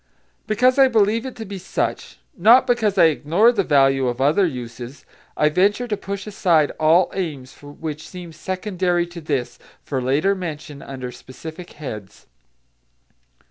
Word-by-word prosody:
Because 250 +5 +3
I 270 - +8
believe 225 +1 +2
it 260 - -8
to 225 -2 -7
be 195 -1 -7
such, 185 - -3 0.2
not 230 +8 +6
because 235 -5 +1
I - - +6
ignore 165 +8 +4
the 205 -5 0
value 135 -4 +3
of 120 0 -3
other 155 +8 +3
uses, 125 -1 -8 0.3
I 150 - +4
venture 205 +9 +1
to 215 - -1
push 200 0 -6
aside 170 -7 +2
all 160 +4 +4
aims 145 -9 -5
which 150 +1 -7
seem 180 -2 -9
secondary 180 0 -1
to 175 0 -10
this 140 -5 -3 0.2
for 135 -3 -3
later 145 +10 +2
mention 155 -6 -7
under 130 -2 -7
specific 160 +8 -10
heads. 110 -10 -9
170 Hz, 150 wpm, -21 LUFS, 145-200 Hz, 0.3 s, I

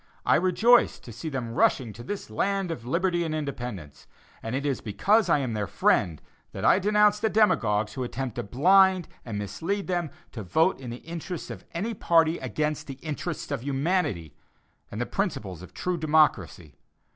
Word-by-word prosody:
I - - +4
rejoice 215 +8 +4
to 120 - -11
see 115 +8 -6
them 125 -5 -4
rushing 120 -2 +2
to 120 - -10
this 195 - -6
land 195 - -1
of 120 -7 -6
liberty 175 +4 +1
and 160 -2 -2
independence; 120 - -6 0.3
and 115 +3 -4
it 140 +2 -2
is 140 -4 -1
because 190 - +2
I 165 - +5
am 130 -5 -2
their 105 -2 -2
friend 80 -4 +1 0.3
that - - -4
I - - +6
denounce 210 +1 +3
the 220 +1 +1
demagogues 110 - +2
who 130 - -3
attempt 125 0 -4
to - - 0
blind 185 - +4 0.2
and 115 -4 -5
mislead 165 - -3
them 175 -3 -1 0.2
to 115 - -7
vote 160 - +1
in 130 -3 -7
the 120 +1 -8
interests 170 +1 -6
of - - -9
any 210 +7 -2
party 165 -4 +2
against 150 +4 -2
the 135 - -6
interests 160 +1 -4
of - - -2
humanity, 135 - -1 0.5
and 105 - -6
the 120 - 0
principles 105 - -3
of 90 - -11
true 180 -1 -3
democracy. 150 - +1
150 Hz, 180 wpm, -26 LUFS, 115-185 Hz, 0.5 s, I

